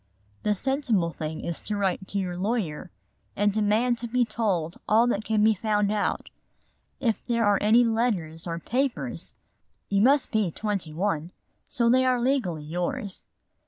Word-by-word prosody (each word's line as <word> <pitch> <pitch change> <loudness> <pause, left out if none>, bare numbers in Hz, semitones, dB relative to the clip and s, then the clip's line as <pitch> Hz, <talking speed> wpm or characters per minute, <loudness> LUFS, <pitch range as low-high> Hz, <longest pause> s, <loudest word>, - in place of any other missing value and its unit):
"The 210 0 +1
sensible 235 - 0
thing 155 -1 -5
is 170 - -4
to 210 - -3
write 190 -1 -1
to 200 - -4
your 185 -2 -2
lawyer 185 -4 -2 0.5
and 205 0 +2
demand 220 +3 +2
to 235 - -4
be 245 +1 +2
told 195 -7 -2
all 225 +2 +5
that 220 -3 0
can 215 -1 +1
be 220 0 +5
found 210 0 0
out. 210 -1 -1 0.7
If 235 -5 0
there 235 -2 +1
are 205 -1 +3
any 225 +4 +5
letters 205 -9 -1
or 165 0 -3
papers, 255 +9 -2 0.5
you 200 0 +2
must 275 +4 +4
be 215 -5 +1
twenty 195 -3 -3
one, 165 -1 -1 0.4
so 235 -1 +1
they 255 +2 +5
are 255 -1 +2
legally 235 - 0
yours. 175 +4 -3
210 Hz, 160 wpm, -26 LUFS, 180-235 Hz, 0.7 s, all